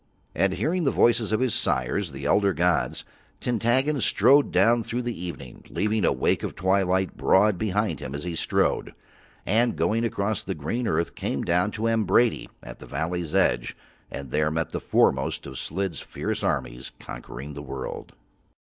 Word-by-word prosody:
And 95 Hz, -1 st, +1 dB
hearing 170 Hz, -, 0 dB
the 140 Hz, -, +3 dB
voices 115 Hz, -4 st, +3 dB
of 110 Hz, -, +1 dB
his 130 Hz, -5 st, +1 dB
sires, 65 Hz, +9 st, 0 dB
the 70 Hz, 0 st, -8 dB
elder 100 Hz, +5 st, +3 dB
gods, 85 Hz, +2 st, 0 dB, 0.4 s
Tintaggon 125 Hz, +4 st, +1 dB
strode 130 Hz, +8 st, +4 dB
down 120 Hz, +1 st, +4 dB
through 120 Hz, +2 st, -3 dB
the 120 Hz, -8 st, -4 dB
evening, 70 Hz, -8 st, -8 dB
leaving 105 Hz, +1 st, 0 dB
a -, -, +4 dB
wake -, -, +1 dB
of -, -, -5 dB
twilight 95 Hz, 0 st, +1 dB
broad 100 Hz, 0 st, +3 dB
behind 105 Hz, -6 st, -1 dB
him 70 Hz, -1 st, -6 dB
as 70 Hz, -, -5 dB
he 90 Hz, -1 st, -4 dB
strode: 80 Hz, -, 0 dB, 0.5 s
and 115 Hz, +4 st, +2 dB
going 115 Hz, +2 st, +1 dB
across 110 Hz, -3 st, -1 dB
the -, -, -4 dB
green 115 Hz, -, -3 dB
earth 85 Hz, -1 st, 0 dB
came -, -, -3 dB
down 90 Hz, +4 st, +2 dB
to 110 Hz, -, -5 dB
Ambrady 115 Hz, +1 st, +2 dB
at -, -, -10 dB
the -, -, -11 dB
valley's 85 Hz, 0 st, -3 dB
edge, -, -, +1 dB, 0.3 s
and 70 Hz, -3 st, -7 dB
there 75 Hz, 0 st, +2 dB
met 80 Hz, +1 st, -2 dB
the -, -, -4 dB
foremost -, -, +1 dB
of 65 Hz, -, -7 dB
Slid's 95 Hz, +1 st, -3 dB
fierce -, -, -4 dB
armies 60 Hz, +2 st, -2 dB
conquering 70 Hz, +4 st, -8 dB
the 70 Hz, -, -7 dB
world. 65 Hz, -2 st, -7 dB
95 Hz, 170 wpm, -25 LUFS, 80-115 Hz, 0.5 s, strode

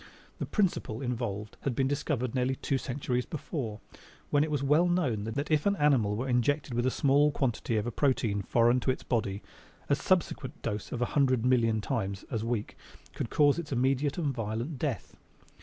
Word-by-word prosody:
The -, -, -3 dB
principle 175 Hz, -, 0 dB
involved 115 Hz, -5 st, -3 dB
had 135 Hz, -4 st, -1 dB
been 135 Hz, +1 st, +2 dB
discovered 135 Hz, -4 st, -1 dB
nearly 130 Hz, 0 st, +1 dB
two 135 Hz, 0 st, -1 dB
centuries 125 Hz, -1 st, -2 dB
before, 130 Hz, -, -4 dB, 0.5 s
when 145 Hz, 0 st, +4 dB
it 155 Hz, -, -2 dB
was 145 Hz, -2 st, -1 dB
well 150 Hz, +6 st, +4 dB
known 135 Hz, -, 0 dB
that 140 Hz, +7 st, -3 dB
if 155 Hz, +4 st, +3 dB
an 200 Hz, -, +3 dB
animal 135 Hz, -, +3 dB
were 125 Hz, +5 st, -2 dB
injected 130 Hz, +3 st, +1 dB
with 120 Hz, +2 st, +1 dB
a -, -, +4 dB
small 145 Hz, +3 st, +3 dB
quantity 120 Hz, -4 st, -1 dB
of 105 Hz, -, 0 dB
a 120 Hz, -, -2 dB
protein 115 Hz, -6 st, +1 dB
foreign 120 Hz, +4 st, +3 dB
to 130 Hz, -, -2 dB
his 130 Hz, -, -1 dB
body, 105 Hz, -5 st, -1 dB, 0.5 s
a 140 Hz, -, +5 dB
subsequent 150 Hz, -3 st, 0 dB
dose 105 Hz, -2 st, -3 dB
a -, -, -2 dB
hundred 130 Hz, -3 st, +2 dB
million 115 Hz, -4 st, +3 dB
times 100 Hz, -3 st, -3 dB
as 110 Hz, -2 st, -1 dB
weak 115 Hz, -2 st, -2 dB, 0.4 s
would 115 Hz, -, -2 dB
cause 145 Hz, 0 st, +4 dB
its 155 Hz, -4 st, -6 dB
immediate 135 Hz, +3 st, +1 dB
and 150 Hz, -6 st, 0 dB
violent 115 Hz, +5 st, -3 dB
death. 135 Hz, -, -3 dB
130 Hz, 185 wpm, -29 LUFS, 115-145 Hz, 0.5 s, a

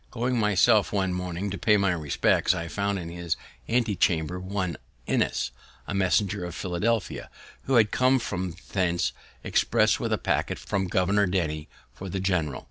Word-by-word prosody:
Going 120 Hz, +1 st, -1 dB
myself 105 Hz, 0 st, +4 dB
one 95 Hz, -2 st, 0 dB
morning 90 Hz, +2 st, -3 dB
to 100 Hz, -, -4 dB
pay 105 Hz, -1 st, +4 dB
my 100 Hz, -2 st, +2 dB
respects, 80 Hz, +2 st, +2 dB
I 85 Hz, -2 st, -4 dB
found 100 Hz, +2 st, -1 dB
in 85 Hz, -3 st, -5 dB
his 85 Hz, -1 st, -3 dB, 0.3 s
antechamber 95 Hz, -7 st, +1 dB
one 95 Hz, -3 st, -3 dB, 0.3 s
Innis, -, -, 0 dB, 0.4 s
a -, -, -3 dB
messenger 95 Hz, 0 st, +1 dB
of 85 Hz, -1 st, -5 dB
Philadelphia, 100 Hz, +5 st, -1 dB, 0.4 s
who 135 Hz, -, +1 dB
had 110 Hz, -3 st, +5 dB
come 130 Hz, +1 st, +4 dB
from 95 Hz, -7 st, -3 dB, 0.2 s
thence 85 Hz, -8 st, +1 dB, 0.3 s
express -, -, +2 dB
with -, -, -2 dB
a -, -, +2 dB
packet -, -, -1 dB
from 95 Hz, -2 st, -2 dB
Governor 95 Hz, +3 st, +2 dB
Denny 80 Hz, -5 st, -2 dB, 0.2 s
for 95 Hz, +7 st, -8 dB
the 95 Hz, -, -3 dB
general. 90 Hz, -7 st, 0 dB
95 Hz, 160 wpm, -26 LUFS, 85-105 Hz, 0.4 s, had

